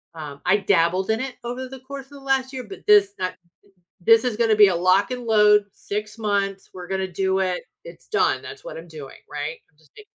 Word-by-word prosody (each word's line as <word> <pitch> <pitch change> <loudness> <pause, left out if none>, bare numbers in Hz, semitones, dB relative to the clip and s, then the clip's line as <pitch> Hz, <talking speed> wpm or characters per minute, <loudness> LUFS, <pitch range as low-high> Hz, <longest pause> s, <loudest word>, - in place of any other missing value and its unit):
um 145 -3 -8
I 190 +3 +4
dabbled 190 0 +1
in 220 - 0
it 260 -1 -4
over 250 +2 -5
the 265 0 -10
course 275 0 -8
of - - -30
the 285 - -11
last 270 -1 0
year, 255 -1 -5
but 195 -4 -10
this 205 -1 +6
that 185 0 -2 0.7
this 225 +5 +5
is 240 -4 -1
gonna 225 -2 +3
be 205 -2 +8
a 175 - 0
lock 185 +6 +3
and 250 -2 -5
load 210 -2 +5
6 210 +1 -5
months. 200 -2 -1
We're 180 -1 -9
gonna 190 0 -1
do 190 +2 0
it. 185 -1 -1 0.2
It's - - -13
done. - - +1
That's - - -10
what - - -7
I'm 170 +1 -11
doing, 150 -4 -10
right? 150 +2 -4
I'm 150 - -39
just 155 - -27
d 425 - -14
205 Hz, 230 wpm, -23 LUFS, 185-235 Hz, 0.7 s, be